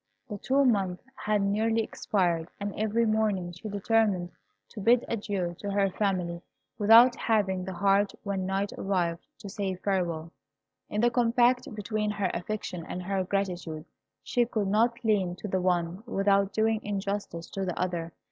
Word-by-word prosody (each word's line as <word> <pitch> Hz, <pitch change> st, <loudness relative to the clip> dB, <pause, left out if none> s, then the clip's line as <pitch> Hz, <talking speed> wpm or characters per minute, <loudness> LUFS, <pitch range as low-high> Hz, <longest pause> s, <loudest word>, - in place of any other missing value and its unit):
The 205 Hz, -2 st, -5 dB
two 275 Hz, +5 st, +2 dB
months 195 Hz, -7 st, +1 dB
had 210 Hz, -1 st, 0 dB
nearly 220 Hz, +3 st, +1 dB
expired, 175 Hz, -6 st, -1 dB
and 200 Hz, 0 st, -3 dB
every 220 Hz, +2 st, +1 dB
morning 215 Hz, -5 st, 0 dB
she 175 Hz, +5 st, -8 dB
determined 205 Hz, -3 st, +1 dB, 0.4 s
to 220 Hz, -, -9 dB
bid 235 Hz, +4 st, +4 dB
adieu 200 Hz, -6 st, -2 dB
to 205 Hz, -, -4 dB
her 200 Hz, -1 st, +1 dB
family, 180 Hz, -4 st, -1 dB, 0.4 s
without 230 Hz, +4 st, +7 dB
having 195 Hz, -5 st, +1 dB
the 190 Hz, -, -5 dB
heart 195 Hz, +2 st, +2 dB
when 195 Hz, -2 st, -2 dB
night 195 Hz, +1 st, -1 dB
arrived 175 Hz, -4 st, -1 dB
to 205 Hz, -, -10 dB
say 195 Hz, -1 st, -3 dB
farewell. 175 Hz, -4 st, -2 dB, 0.6 s
In 210 Hz, -, -1 dB
the 240 Hz, 0 st, +4 dB
combat 245 Hz, +2 st, +3 dB
between 210 Hz, 0 st, -2 dB
her 200 Hz, -3 st, -1 dB
affection 180 Hz, -2 st, -4 dB
and 180 Hz, -, -5 dB
her 190 Hz, +1 st, -1 dB
gratitude, 180 Hz, -5 st, -3 dB, 0.4 s
she 245 Hz, -, +2 dB
could 215 Hz, -4 st, -1 dB
not 235 Hz, +4 st, +1 dB
lean 195 Hz, -5 st, +2 dB
to 195 Hz, -, -7 dB
the 185 Hz, -1 st, 0 dB
one 175 Hz, 0 st, 0 dB
without 200 Hz, -2 st, +2 dB
doing 220 Hz, 0 st, +1 dB
injustice 200 Hz, -4 st, -3 dB
to 195 Hz, -, -3 dB
the 180 Hz, -2 st, -3 dB
other. 175 Hz, -2 st, -2 dB
200 Hz, 160 wpm, -28 LUFS, 185-215 Hz, 0.6 s, without